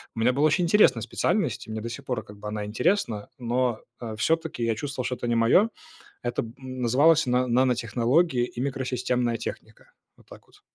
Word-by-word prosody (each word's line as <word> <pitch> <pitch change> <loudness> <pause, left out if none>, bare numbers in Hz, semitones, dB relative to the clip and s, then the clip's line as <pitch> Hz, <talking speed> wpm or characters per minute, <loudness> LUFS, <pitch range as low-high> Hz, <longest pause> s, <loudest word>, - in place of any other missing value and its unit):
У - - -5
меня 125 +3 +3
была 145 +3 +3
очень 175 +4 +2
интересная 170 - +4
специальность, 120 - -1
и - - -8
мне 110 - -3
до 115 - -5
сих 135 +4 -7
пор, 125 -4 -2
как 105 -1 -13
бы, 105 - -7
она 105 0 -3
интересна, 110 - 0
но, 120 -1 -1 0.2
э, 110 -2 -5
всё-таки 160 -3 0
я 115 -1 +1
чувствовал, 135 0 -4
что 125 - -1
это 120 - -5
не 120 - +1
моё. 120 - +4 0.5
Это 120 0 -1
б 115 0 -9
называлось 130 +5 +3
на 125 +1 +2
"Нанотехнологии 125 +3 +2
и 120 - -8
микросистемная 125 -3 -1
техника". - - -8 0.3
Вот - - -22
так - - -15
вот. - - -22
125 Hz, 195 wpm, -26 LUFS, 115-140 Hz, 0.5 s, интересная